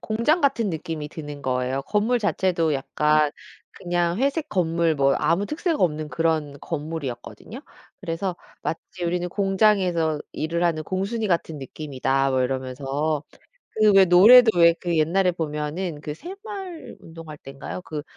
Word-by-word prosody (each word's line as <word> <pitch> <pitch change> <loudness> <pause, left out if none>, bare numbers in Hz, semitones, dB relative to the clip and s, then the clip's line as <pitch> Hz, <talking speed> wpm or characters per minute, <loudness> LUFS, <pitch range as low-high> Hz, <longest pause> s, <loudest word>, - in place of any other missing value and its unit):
공장 235 +10 +1
같은 270 -7 +1
느낌이 160 -3 -5
드는 145 -2 -8
거예요. 130 +1 -1
건물 215 - +1
자체도 180 -7 0
약간 150 +2 +1 0.4
그냥 175 0 -1
회색 280 +4 0
건물 170 -3 +1
뭐 140 -1 +3
아무 170 +7 +1
특색 325 - -2
없는 155 -4 0
그런 155 -1 -1
건물이었거든요. 150 -5 -6 0.4
그래서 170 +2 -3 0.3
"마치 175 +2 -5
우리는 175 +1 -1
공장에서 190 -5 +1
일을 170 +2 -2
하는 165 -2 +1
공순이 200 +6 -2
같은 165 -3 -1
느낌이다." 135 -1 -1
뭐 130 - +1
이러면서. 135 +4 -2 0.6
그 215 -1 +6
왜 195 -1 +8
노래도 220 +4 +7
왜 170 -1 +6
그 170 -2 -1
옛날에 180 +4 +2
보면은 155 0 -4
그 150 0 -5
새마을 385 - -8
운동할 160 -2 -10
때인가요? 135 +6 -8
그 155 -4 -6
165 Hz, 315 characters per minute, -24 LUFS, 150-195 Hz, 0.6 s, 왜